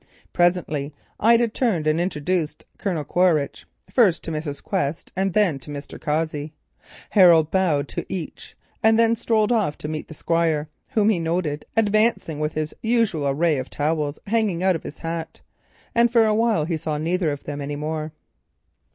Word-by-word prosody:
Presently 160 -5 +1 0.2
Ida 235 +2 +5
turned 220 -8 0
and 155 +2 +2
introduced 175 -1 -2
Colonel 175 -7 -1
Quaritch, 160 -3 +1 0.2
first 205 -9 +3
to 165 - -4
Mrs. 150 -2 -5
Quest 145 +3 -2
and 190 0 0
then 190 -10 +2
to 135 - -12
Mr. 145 0 -8
Cossey. 155 -1 -2 0.6
Harold 170 -6 +6
bowed 160 -7 +1
to - - -5
each, 175 -5 -6 0.2
and 220 0 +4
then 230 0 +4
strolled 220 -1 +1
off 210 -11 +1
to - - -6
meet 155 0 -4
the 160 - -10
Squire, 160 -2 0 0.2
whom 220 -5 +2
he 205 -6 +2
noted 165 -3 -2
advancing 215 -7 +2
with 150 0 -1
his 155 0 -3
usual 225 -11 +1
array 150 +1 +1
of 130 - -5
protective - - -14 0.2
towels 150 -1 -3
hanging 205 -5 0
out 190 -1 +3
of 165 - -4
his - - -9
hat, 165 0 -5 0.5
and 235 0 +4
for 230 -2 +5
a 215 - +2
while 220 -8 +2
saw 155 -1 -2
neither 165 +2 0
of 145 - -6
them 145 0 -5
any 145 +1 -4
more. 155 +1 -3
165 Hz, 170 wpm, -23 LUFS, 150-210 Hz, 0.6 s, Harold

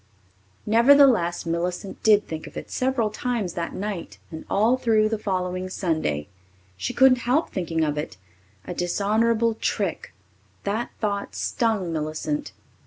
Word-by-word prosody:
Nevertheless, 235 -7 +5
Millicent 175 +3 -3
did 210 -2 +4
think 160 -1 -6
of - - -10
it - - -7
several 255 -4 0
times 215 -5 -2
that 170 -1 -4
night 200 -3 -5
and 160 -1 -8
all 220 +5 +3
through 220 -4 +2
the 220 -1 -2
following 185 -2 -2
Sunday. 155 - -1 0.5
She 95 +1 -3
couldn't 265 -1 +5
help 300 +6 +2
thinking 165 -4 -1
of 150 -1 0
it. 95 -10 -6 0.5
A - - -5
dishonourable 220 +6 +1
trick! - - -2 0.5
That 215 +4 -2
thought 200 -2 -2
stung 215 -8 0
Millicent. 160 - -3
200 Hz, 135 wpm, -24 LUFS, 170-230 Hz, 0.5 s, Nevertheless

